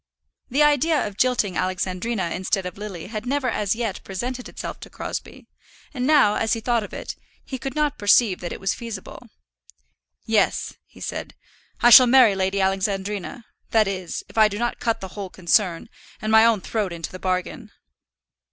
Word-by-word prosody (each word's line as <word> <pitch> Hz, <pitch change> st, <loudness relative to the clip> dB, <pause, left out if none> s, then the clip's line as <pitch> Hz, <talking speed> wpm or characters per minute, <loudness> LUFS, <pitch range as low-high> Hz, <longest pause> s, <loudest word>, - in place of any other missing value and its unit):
The 275 Hz, +4 st, +3 dB
idea 295 Hz, +1 st, +3 dB
of 205 Hz, -, -6 dB
jilting 220 Hz, -5 st, +1 dB
Alexandrina 185 Hz, +1 st, -2 dB
instead 190 Hz, +1 st, -1 dB
of 180 Hz, -, -6 dB
Lily 195 Hz, -5 st, -7 dB
had 215 Hz, +3 st, -6 dB
never 275 Hz, 0 st, 0 dB
as 210 Hz, 0 st, 0 dB
yet 225 Hz, -4 st, -3 dB
presented 245 Hz, +6 st, -5 dB
itself -, -, -7 dB
to -, -, -11 dB
Crosbie, -, -, -7 dB, 0.5 s
and 255 Hz, -2 st, -2 dB
now, 290 Hz, -9 st, +5 dB
as 225 Hz, 0 st, 0 dB
he 230 Hz, -, -1 dB
thought 235 Hz, 0 st, 0 dB
of 205 Hz, -, -9 dB
it, -, -, -6 dB, 0.3 s
he 260 Hz, -, -6 dB
could 270 Hz, 0 st, -5 dB
not 300 Hz, -2 st, 0 dB
perceive 205 Hz, -1 st, +4 dB
that 175 Hz, -, -6 dB
it -, -, -6 dB
was 195 Hz, 0 st, 0 dB
feasible. 230 Hz, -3 st, -8 dB, 1.0 s
"Yes," -, -, +1 dB
he -, -, -17 dB
said, -, -, -5 dB, 0.5 s
"I 240 Hz, -, +6 dB
shall 250 Hz, +2 st, +10 dB
marry 245 Hz, -4 st, +6 dB
Lady 190 Hz, +1 st, -1 dB
Alexandrina; 195 Hz, +3 st, -2 dB, 0.2 s
that 220 Hz, -2 st, +3 dB
is, 185 Hz, -3 st, -4 dB
if -, -, -4 dB
I 215 Hz, -, +7 dB
do 205 Hz, -1 st, -5 dB
not 240 Hz, +2 st, -2 dB
cut 230 Hz, -1 st, -1 dB
the 190 Hz, -, -6 dB
whole 195 Hz, 0 st, -7 dB
concern, 180 Hz, -1 st, +1 dB, 0.3 s
and 215 Hz, -, -3 dB
my 220 Hz, 0 st, +7 dB
own 225 Hz, -4 st, +2 dB
throat 210 Hz, -3 st, -2 dB
into 165 Hz, -1 st, -6 dB
the 185 Hz, -, -9 dB
bargain." 185 Hz, +5 st, -3 dB
210 Hz, 180 wpm, -23 LUFS, 190-240 Hz, 1.0 s, shall